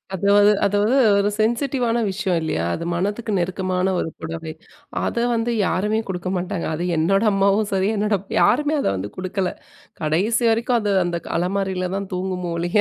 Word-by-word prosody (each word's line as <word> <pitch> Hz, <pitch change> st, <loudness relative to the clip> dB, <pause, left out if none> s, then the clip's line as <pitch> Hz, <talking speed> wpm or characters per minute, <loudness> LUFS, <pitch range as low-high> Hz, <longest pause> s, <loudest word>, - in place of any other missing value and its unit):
அதுவ் 200 Hz, +2 st, +3 dB, 0.3 s
அதுவ் 205 Hz, +1 st, +1 dB, 0.3 s
ஒரு 200 Hz, 0 st, +2 dB
சென்சிட்டிவான 240 Hz, +1 st, +1 dB
விஷயம் 190 Hz, -3 st, -1 dB
இல்லயா? 85 Hz, -, -1 dB
அது 165 Hz, -, -4 dB
மனதுக்கு 205 Hz, +6 st, -2 dB
நெருக்கமான 185 Hz, +1 st, -1 dB
ஒரு -, -, -1 dB
புடவை. 160 Hz, 0 st, -5 dB, 0.5 s
அத -, -, -2 dB, 0.2 s
வந்து 230 Hz, +1 st, 0 dB, 0.2 s
யாருமே 210 Hz, +6 st, 0 dB
குடுக்க 185 Hz, -1 st, -3 dB
மாட்டாங்க. 180 Hz, 0 st, -3 dB
அது 170 Hz, -, -3 dB
என்னோட 195 Hz, +6 st, +2 dB
அம்மாவும் 200 Hz, +2 st, +2 dB
சரி, 190 Hz, +1 st, +1 dB
என்னோட, 210 Hz, 0 st, +1 dB, 0.2 s
யாருமே 295 Hz, +4 st, +3 dB
அத -, -, 0 dB
வந்து 95 Hz, +2 st, -5 dB
குடுக்கல. 185 Hz, 0 st, -2 dB, 0.5 s
கடைசி 190 Hz, +10 st, +1 dB
வரைக்கும் 235 Hz, +2 st, +1 dB
அது 205 Hz, -2 st, 0 dB
அந்த 175 Hz, -1 st, -1 dB
க -, -, -8 dB
அலமாரியில 185 Hz, 0 st, -1 dB
தான் 195 Hz, -1 st, -5 dB
தூங்குமோ 180 Hz, -1 st, -3 dB
ஒழிய 175 Hz, +4 st, 0 dB
195 Hz, 160 wpm, -21 LUFS, 180-210 Hz, 0.5 s, அதுவ்